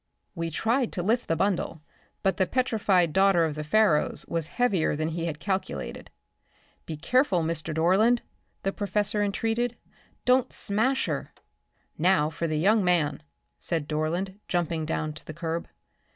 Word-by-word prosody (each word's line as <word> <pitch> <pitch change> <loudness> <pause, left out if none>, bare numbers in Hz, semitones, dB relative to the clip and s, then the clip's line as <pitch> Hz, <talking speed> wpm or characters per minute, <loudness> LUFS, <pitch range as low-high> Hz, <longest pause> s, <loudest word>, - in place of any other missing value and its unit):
We 165 -2 -3
tried 230 - 0
to 175 - -2
lift 230 +6 +1
the 165 - +1
bundle, 180 -4 -1 0.4
but 195 - +2
the 190 - +2
petrified 205 - +2
daughter 190 -3 +4
of 155 - -2
the 150 +1 -5
Pharaohs 165 -1 +2
was 165 -2 -2
heavier 195 -7 +1
than 155 +2 -1
he 165 +1 -3
had 150 -2 -4
calculated. 190 +2 -3 0.8
"Be 160 - -5
careful, 240 - +2
Mr. 160 0 -2
Dorland," 190 +10 +3 0.4
the 195 - 0
professor 205 0 -1
entreated; 225 +4 0 0.5
"don't 250 0 +3
smash 230 +7 +1
her." - - -3 0.7
"Now 160 -3 +3
for 165 +2 -2
the 155 -1 -1
young 205 +6 +4
man," 165 -5 +1 0.4
said 160 -4 -1
Dorland, 170 +6 -2
jumping 165 -3 -1
down 155 -1 -2
to 155 - -9
the 155 - -9
curb. 165 0 -3
180 Hz, 150 wpm, -27 LUFS, 160-210 Hz, 0.8 s, daughter